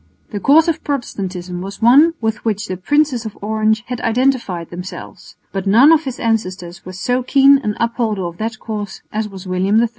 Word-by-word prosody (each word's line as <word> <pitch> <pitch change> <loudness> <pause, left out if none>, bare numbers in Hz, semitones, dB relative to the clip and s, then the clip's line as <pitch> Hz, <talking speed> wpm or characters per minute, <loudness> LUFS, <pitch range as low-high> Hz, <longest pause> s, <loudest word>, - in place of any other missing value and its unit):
The 205 - -3
cause 305 - +5
of 330 -1 -1
Protestantism 185 -10 -4
was 195 +2 -7
one 280 +9 +5
with 220 -1 -2
which 210 -2 -1
the 185 - -4
Princes 280 - +1
of 220 -2 -8
Orange 215 +1 0
had 250 -2 -5
identified 230 -8 0
themselves; 180 +1 -9 0.2
but 195 0 -4
none 240 +10 +6
of 325 -1 +3
his 260 -2 -5
ancestors 185 -6 -2
was 185 0 -9
so 250 +3 0
keen 275 +2 +5
an 210 -6 -3
upholder 230 -4 -1
of 170 0 -7
that 220 0 -3
cause 210 -3 -6
as 215 0 -2
was 195 -2 -10
William 190 +4 +1
III. 235 0 +2
220 Hz, 190 wpm, -18 LUFS, 190-250 Hz, 0.2 s, none